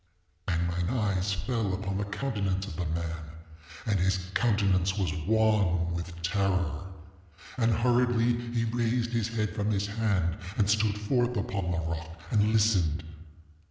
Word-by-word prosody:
ŌĆ£And 85 -1 +1
mine 85 +1 -1
eyes 100 -3 0
fell 100 0 -1
upon 95 0 -3
the 100 - -1
countenance 100 -3 -2
of 100 - -7
the 85 +1 -2
man, 85 +1 -2 0.7
and 105 -4 +1
his 95 +2 +2 0.2
countenance 100 -4 +2
was 90 -5 0
wan 100 -6 +3
with 85 0 -5
terror. 90 -3 0 0.7
And, 115 -2 +2
hurriedly, 120 0 +3 0.2
he 115 -1 0
raised 120 +1 0
his 115 -2 0
head 110 -2 -2
from 105 -1 0
his 100 -1 +1
hand, 100 -5 0 0.2
and 105 -4 +3
stood 110 -1 +2
forth 120 +2 +1
upon 100 -2 -2
the 90 - 0
rock 80 0 -5
and 105 0 +3
listened. 95 -8 +2
100 Hz, 150 wpm, -29 LUFS, 90-110 Hz, 0.7 s, wan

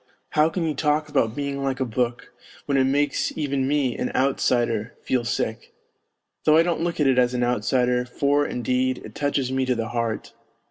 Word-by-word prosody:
How 150 +1 +3
can 170 +1 -2
you 155 - 0
talk 150 +2 0
about 120 -6 +1
being 140 -1 -3
like 135 -1 -1
a 130 - +1
book, 120 0 -2 0.3
when 140 - 0
it 135 -1 +4
makes 145 +1 0
even 140 -3 0
me, 140 -3 +1
an - - -2
outsider, 120 -4 +1
feel 125 -2 0
sick? 115 -1 -3 0.7
Though 155 0 +5
I 165 - +6
don't 170 -2 -1
look 170 -1 -2
at 150 - +3
it 130 -2 +4
as 125 0 +2
an 125 - +1
outsider, 125 +1 +1
for, 140 +3 +1
indeed, 130 0 -1
it 110 - -10
touches 140 -2 -1
me 130 0 0
to 125 - +2
the 115 -1 -3
heart. 115 -2 -3
130 Hz, 195 wpm, -24 LUFS, 120-145 Hz, 0.7 s, I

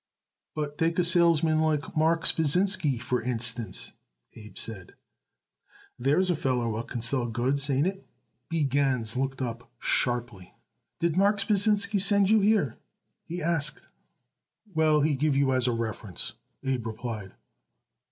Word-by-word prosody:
"But 150 -1 -4
take 165 0 +1
a 180 - +3
salesman 165 -2 +3
like 155 -2 -1
Marks 165 +2 +4
Pasinsky, 160 -3 +2
for 125 0 -2
instance," 115 -4 -2 0.4
Abe 105 -3 -12
said. 95 -5 -4 1.0
"There's 150 +9 +2
a - - +1
feller 130 -5 -1
what 115 +1 -4
can 120 -3 -5
sell 120 0 +1
goods. 130 +5 -1
Ain't 140 +2 +2
it?" 190 +1 -4 0.4
B. 165 -2 0
Gans 130 -5 0
looked 135 +1 -2
up 115 -1 -6
sharply. 120 -7 -1 0.4
"Did 170 0 0
Marks 200 +1 +4
Pasinsky 205 -1 +2
send 200 0 +4
you 220 - +5
here?" 200 - +1 0.5
he 175 0 -5
asked. 155 -3 -1 0.8
"Well, 155 -2 +3
he 150 0 +2
give 145 +1 +1
you 135 -1 +2
as 130 -1 +1
a - - +2
reference," 110 -3 -4 0.3
Abe 130 -4 -2
replied. 110 -3 -6
140 Hz, 140 wpm, -27 LUFS, 120-165 Hz, 1.0 s, you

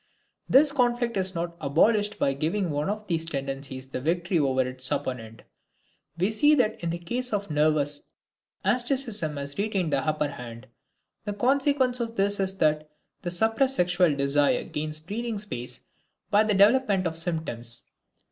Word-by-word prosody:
This 280 +2 +6
conflict 240 -3 +1
is 190 -1 0
not 170 0 -3
abolished 205 +8 +2
by 140 -8 +1
giving 165 +6 -1
one 145 +4 -1
of 215 +1 -3
these 165 -4 -1
tendencies 135 -3 -4
the 130 - -5
victory 175 +3 0
over 130 -3 +2
its 130 0 -4
opponent. 115 -3 -4 0.7
We 185 +5 +1
see 295 +7 +4
that 225 -8 0
in 170 - -1
the 170 - -2
case 245 +9 -3
of 205 -2 -2
the - - -4
nervous, 150 -1 +2 0.6
asceticism 240 - 0
has 140 +2 -6
retained 195 -7 0
the 140 - +3
upper 150 +1 0
hand. 120 -3 -9 0.6
The 205 - -2
consequence 260 +2 +2
of 230 -1 -3
this 200 0 +1
is 190 0 -1
that 155 -2 +1 0.3
the 175 - -3
suppressed 225 +9 +2
sexual 175 - +3
desire 140 +1 +2
gains 155 0 -4
breathing 220 +7 -4
space 165 - -5 0.5
by 210 +1 +5
the 210 -1 +1
development 205 -1 +4
of 165 -1 -1
symptoms. 160 -9 -3
175 Hz, 160 wpm, -26 LUFS, 145-215 Hz, 0.7 s, This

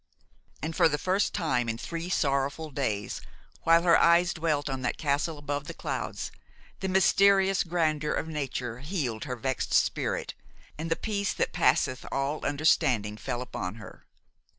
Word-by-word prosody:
And 160 +1 -3
for - - +5
the 145 - 0
first 185 +6 +1
time 125 -8 0
in 115 - -2
three 165 +7 -5
sorrowful 140 0 0
days, 105 - -2 0.4
while 165 +1 +6
her 170 -2 +6
eyes 170 +1 +5
dwelt 155 -3 0
on 135 -2 -3
that 125 - -1
castle 150 +1 0
above 145 -1 -3
the - - -7
clouds, - - -4 0.5
the 190 - -2
mysterious 195 0 +4
grandeur 155 -3 0
of - - -2
nature 130 -6 -4
healed 135 - -3
her 125 - -3
vexed 130 +2 -1
spirit, - - 0 0.4
and 160 +2 -5
the 165 - +2
peace 200 -1 -2
that - - -1
passeth 130 0 +2
all 140 +3 -1
understanding 130 -8 +2
fell 120 +3 -4
upon 100 -5 -5
her. 115 - -12
150 Hz, 155 wpm, -28 LUFS, 130-170 Hz, 0.5 s, while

